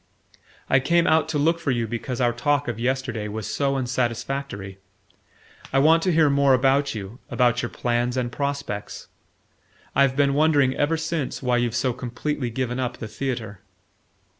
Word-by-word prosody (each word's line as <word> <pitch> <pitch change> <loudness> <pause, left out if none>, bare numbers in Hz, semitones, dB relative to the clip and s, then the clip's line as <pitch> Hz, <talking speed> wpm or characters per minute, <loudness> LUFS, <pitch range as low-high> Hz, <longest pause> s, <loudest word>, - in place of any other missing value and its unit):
"I 130 - +4
came 170 +5 +2
out 160 0 +3
to 155 - -1
look 165 +3 +2
for 150 - -3
you 120 -3 +1
because 120 +3 -4
our 120 -2 +2
talk 145 +4 0
of 120 -2 -3
yesterday 120 -3 -2
was 105 +1 -5
so 140 -1 0
unsatisfactory. 120 -5 -3 0.9
I 135 - +1
want 160 +4 +5
to 185 - +1
hear 160 -2 +4
more 140 -1 +4
about 135 +1 +2
you 105 +3 -7
about 120 -1 +2
your 120 - -3
plans 120 +1 -1
and 120 -1 -1
prospects. 140 -8 -4 0.9
I've 135 -1 +3
been 140 -1 +3
wondering 145 -3 +3
ever 155 +3 +1
since 155 -4 -3
why 125 -1 +2
you've 120 -1 0
so 125 0 +1
completely 125 +2 -3
given 125 +1 -3
up 125 -1 -2
the 110 - -6
theatre." 110 -4 -4
130 Hz, 165 wpm, -24 LUFS, 120-140 Hz, 0.9 s, want